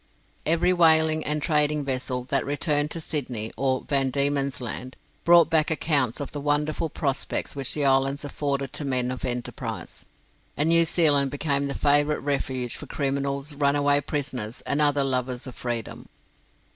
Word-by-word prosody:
Every 170 +3 +3
whaling 160 -2 +4
and 150 0 -1
trading 150 -1 +1
vessel 130 -1 -2
that - - +2
returned 145 +1 0
to 165 - -3
Sydney 125 -9 -4
or 130 +1 0
Van 135 -2 +1
Diemen's 140 0 0
Land 125 +1 -5 0.3
brought 170 -2 +7
back 160 -1 +3
accounts 145 -6 +1
of 145 - -5
the 145 - -5
wonderful 150 +2 0
prospects 140 -1 -2
which 135 -2 -1
the 145 -2 0
islands 135 +1 +2
afforded 140 -1 -3
to - - -1
men 125 -2 0
of 130 - -6
enterprise, 125 -1 -5 0.5
and 150 +3 +2
New 170 0 +6
Zealand 145 -4 +3
became 140 0 -1
the 140 - -3
favourite 145 +1 +2
refuge 130 -3 -2
for - - -10
criminals, 140 +1 -2
runaway 145 0 +2
prisoners, 130 -6 -4
and 145 +2 0
other 145 -1 +3
lovers 130 -1 -2
of 130 - -8
freedom. 120 -3 -5
140 Hz, 160 wpm, -25 LUFS, 130-150 Hz, 0.5 s, brought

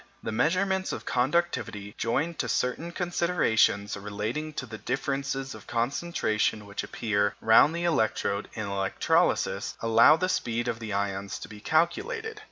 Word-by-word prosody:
The - - -3
measurements 190 - +1
of - - -6
conductivity, 125 -7 -1
joined 150 +9 -1
to - - -1
certain 160 +7 -1
considerations 170 - +1
relating 105 +9 -4
to 135 - -4
the 110 -2 -9
differences 135 +1 -2
of - - -12
concentration 115 -4 0
which 100 0 -5
appear 105 -2 0
round 110 +8 +5
the 170 - -2
electrode 110 -10 0
in 110 -2 -3
electrolysis, 100 -1 0
allow 115 +5 +6
the 185 - 0
speed 120 -8 -1
of 115 -2 -2
the 110 -2 -6
ions 100 0 -2
to - - -8
be 105 -1 -11
calculated. 430 - 0
120 Hz, 145 wpm, -27 LUFS, 105-170 Hz, -, allow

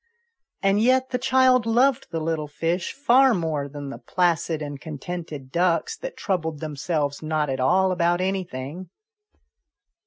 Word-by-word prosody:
And 195 +1 +3
yet 260 +2 +3
the 250 - 0
child 255 -2 +3
loved 245 +3 +3
the 165 0 -3
little 155 -1 -2
fish 165 +4 -2
far 265 -2 +4
more 155 -5 -2
than 145 -1 -7
the - - -8
placid 170 -3 0
and 145 -2 -6
contented 155 -3 -7
ducks 180 - +1
that - - -7
troubled 160 -6 -2
themselves 150 -1 -2
not 155 -2 -1
at 130 - -3
all 185 +8 +3
about 175 -1 +1
anything. 180 -3 -4
170 Hz, 145 wpm, -24 LUFS, 150-200 Hz, -, far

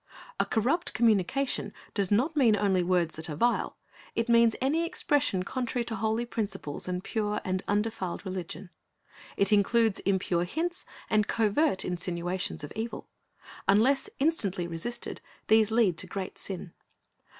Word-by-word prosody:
"' - - -17
A - - +2
corrupt 265 +10 +1
communication 230 +4 +2 0.2
does 200 -4 0
not 255 +10 +2
mean 240 -7 +5
only 195 -3 +2
words 175 -2 +1
that 160 +1 -4
are 150 - -3
vile. 240 +10 +1 0.4
It 230 0 0
means 235 -1 +5
any 295 +6 +1
expression 290 - +1
contrary 245 +2 -2
to 230 - -4
holy 220 +3 0
principles 195 -11 -4
and 180 0 -2
pure 210 -2 -1
and 185 0 -1
undefiled 205 -3 -1
religion. 185 -1 -6 0.7
It 200 +1 +3
includes 220 +1 +3
impure 185 -3 +1
hints 345 - -3 0.2
and 215 -1 +2
covert 225 +2 +2
insinuations 180 -1 -2
of 145 - -7
evil. 225 +2 -5 0.6
Unless 245 +8 +4
instantly 205 - 0
resisted, 175 +9 -5 0.3
these 220 -1 +5
lead 220 -7 +2
to 185 - -1
great 190 +1 -5
sin. 185 -3 -6
210 Hz, 145 wpm, -29 LUFS, 185-235 Hz, 0.7 s, mean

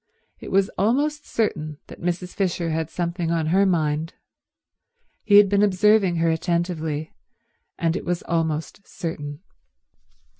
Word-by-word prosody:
It - - -8
was 195 +1 +2
almost 290 +8 +1
certain 155 -9 -2
that - - -13
Mrs. 180 +1 -2
Fisher 175 -3 -1
had 160 0 -2
something 170 -1 -2
on 165 -1 0
her 195 +1 +4
mind. 160 -2 0 1.1
He 205 - +4
had 205 -1 +8
been 200 +1 +2
observing 205 -1 +4
her 165 0 +2
attentively, 160 -2 -2 0.6
and 165 0 0
it - - -3
was 175 -1 -2
almost 165 +3 -2
certain. 150 -4 -6
170 Hz, 135 wpm, -23 LUFS, 160-195 Hz, 1.1 s, had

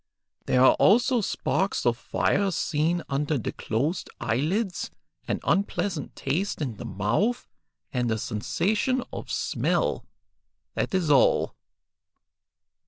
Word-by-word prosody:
There 125 - +4
are - - +7
also 240 +3 +4
sparks 195 -1 -1
of 120 -1 +3
fire 195 +10 0
seen 165 0 0
under 145 +2 0
the 115 - -3
closed 145 - -2
eyelids, 170 - -1 0.4
an - - -1
unpleasant 190 -4 -1
taste 170 +10 -1
in 125 -8 -3
the 125 - -7
mouth, 115 - 0 0.5
and 125 -2 0
a 110 - +1
sensation 210 - 0
of - - -6
smell; - - 0 0.7
that - - -1
is 170 -5 +1
all." 140 - +4
155 Hz, 115 wpm, -26 LUFS, 125-195 Hz, 0.7 s, are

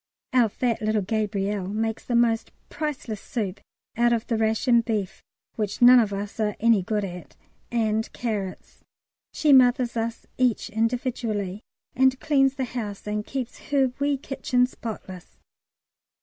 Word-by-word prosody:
Our 245 -3 +4
fat 235 +2 -1
little 215 -1 +1
Gabrielle 205 -2 -1
makes 220 +2 -2
the 240 - -2
most 230 -1 +2 0.2
priceless 285 -8 -4
soup 200 -5 -4 0.4
out 240 +1 +3
of 230 -1 0
the 235 - -1
ration 225 +2 +3
beef 215 -5 -3 0.4
(which 210 -2 -2
none 245 +1 +9
of 215 -3 +1
us 200 +2 -5
are 210 -2 0
any 230 -3 +4
good 210 +1 -1
at) 180 -2 -9 0.4
and 220 -2 0
carrots. 210 -6 -5 0.5
She 300 -2 +3
mothers 250 -2 +5
us 230 0 -3
each 245 -2 +1
individually, 225 -3 -1 0.3
and 260 0 +3
cleans 270 -3 +2
the 265 - -2
house 220 -5 -6
and 210 0 -2
keeps 255 0 -6
her 270 -3 +2
wee 285 0 +1
kitchen 255 -2 0
spotless. 210 -7 -8
225 Hz, 145 wpm, -25 LUFS, 210-250 Hz, 0.5 s, none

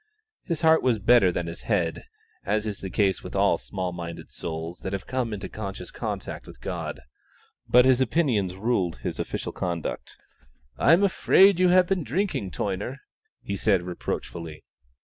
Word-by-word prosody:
His 170 -4 -2
heart 160 0 +5
was 125 -3 +2
better 105 -2 +5
than 85 -1 -2
his 85 0 -7
head, - - -1 0.4
as 105 +2 0
is 105 -2 -4
the 95 - -4
case 95 0 +1
with - - -8
all - - +3
small 90 -1 -4
minded 85 -1 -7
souls 80 +1 -5
that 95 - -5
have 100 0 -3
come 130 -3 -2
into 105 -3 -4
conscious 100 -3 -7
contact - - -5
with - - -12
God, - - -5 0.7
but 125 +1 +7
his 130 0 +4
opinions 115 - +1
ruled 95 -4 0
his - - -3
official - - -3
conduct. 85 -3 -4 0.6
"I - - +5
am 180 +4 +5
afraid 195 -1 +5
you 185 -1 +5
have 180 0 +6
been 185 -2 0
drinking, 145 - -1
Toyner," 100 +8 -3 0.5
he 100 - -3
said 95 -2 +2
reproachfully. 85 -2 -5
105 Hz, 170 wpm, -26 LUFS, 90-130 Hz, 0.7 s, but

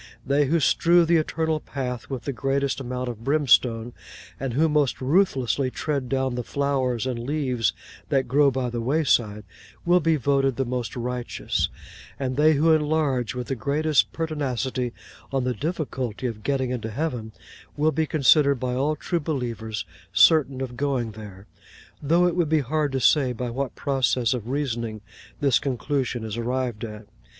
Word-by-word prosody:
They 140 +2 +2
who 165 +4 +2
strew 170 +3 +4
the 170 +1 +4
Eternal 160 0 0
Path 125 -5 -5
with 130 -4 -4
the 140 - -3
greatest 135 +4 -1
amount 125 -1 -4
of 115 -2 -6
brimstone, 120 -4 +2 0.5
and 135 -2 -3
who 160 +4 +4
most 150 -4 +1
ruthlessly 135 -4 +1
tread 140 -1 -3
down 130 -1 0
the 125 0 -3
flowers 130 -3 -1
and 125 -2 -2
leaves 125 -4 0 0.4
that 135 -2 +1
grow 140 +3 +4
by 130 -2 -2
the 120 -1 -3
wayside, 120 -6 +1 0.4
will 175 +1 +5
be 165 -1 +2
voted 135 -1 +1
the 135 - -1
most 125 -1 -3
righteous; 125 0 -2 0.5
and 130 -2 -2
they 155 +3 +5
who 160 +3 +4
enlarge 150 -6 +1
with 125 -1 -3
the 135 - -3
greatest 145 +5 +1
pertinacity 135 -6 -2 0.4
on 135 -2 0
the 125 0 0
difficulty 130 - -3
of 115 -3 -3
getting 130 +1 -1
into 115 -3 -3
heaven, 120 -3 -3 0.5
will 155 +2 +3
be 160 +2 0
considered 140 -1 +4
by 125 0 -2
all 140 +4 0
true 170 +3 -2
believers 115 - -3 0.3
certain 140 -5 +4
of 125 -2 -4
going 130 -4 -1
there: 105 -2 -11 0.6
though 170 +5 +3
it 175 -1 +1
would 170 -4 +1
be 155 -1 +3
hard 150 +2 -1
to 135 - -1
say 130 0 +3
by 120 0 -4
what 135 +2 -3
process 130 -4 +1
of 120 -2 -5
reasoning 120 -6 -2 0.4
this 135 -6 +4
conclusion 130 -2 -2
is 110 0 -5
arrived 120 -2 -2
at. 105 -1 -7
130 Hz, 165 wpm, -24 LUFS, 120-150 Hz, 0.6 s, will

